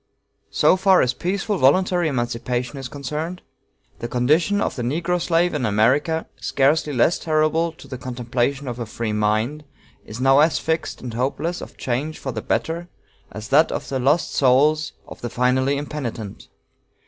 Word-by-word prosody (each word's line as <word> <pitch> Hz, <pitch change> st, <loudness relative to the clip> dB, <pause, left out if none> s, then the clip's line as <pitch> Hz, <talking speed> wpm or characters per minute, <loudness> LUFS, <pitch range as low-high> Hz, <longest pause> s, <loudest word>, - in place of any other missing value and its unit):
So 185 Hz, -, +3 dB
far 190 Hz, 0 st, +5 dB
as 125 Hz, 0 st, +1 dB
peaceful 195 Hz, -, -2 dB
voluntary 175 Hz, +5 st, +3 dB
emancipation 125 Hz, 0 st, -2 dB
is 135 Hz, -, -5 dB
concerned, 150 Hz, +6 st, -5 dB, 0.6 s
the 120 Hz, -, -4 dB
condition 155 Hz, +12 st, +2 dB
of -, -, -1 dB
the 125 Hz, -, -4 dB
negro 170 Hz, +8 st, -1 dB
slave 175 Hz, +1 st, +2 dB
in 150 Hz, -4 st, -2 dB
America, 130 Hz, +10 st, +2 dB
scarcely 145 Hz, +2 st, +1 dB
less 140 Hz, +6 st, +2 dB
terrible 160 Hz, +1 st, +1 dB
to -, -, -14 dB
the 130 Hz, -, -7 dB
contemplation 125 Hz, +2 st, -2 dB
of 125 Hz, 0 st, -5 dB
a 120 Hz, -, -4 dB
free 110 Hz, -1 st, -3 dB
mind, 110 Hz, +8 st, 0 dB, 0.4 s
is 110 Hz, +2 st, -9 dB
now 135 Hz, +2 st, +5 dB
as 155 Hz, 0 st, +4 dB
fixed 160 Hz, 0 st, -2 dB
and 125 Hz, -3 st, -6 dB
hopeless 145 Hz, +8 st, -2 dB
of -, -, -10 dB
change 135 Hz, +5 st, -2 dB
for 130 Hz, -, -5 dB
the 110 Hz, -2 st, -4 dB
better 165 Hz, +12 st, -2 dB, 0.4 s
as 110 Hz, +1 st, -8 dB
that 150 Hz, +4 st, +4 dB
of -, -, -4 dB
the 135 Hz, -1 st, -1 dB
lost 145 Hz, +6 st, +1 dB
souls 145 Hz, +4 st, +3 dB
of -, -, -11 dB
the 120 Hz, -, -4 dB
finally 130 Hz, +3 st, +1 dB
impenitent. 130 Hz, -8 st, -6 dB
140 Hz, 165 wpm, -22 LUFS, 125-160 Hz, 0.6 s, far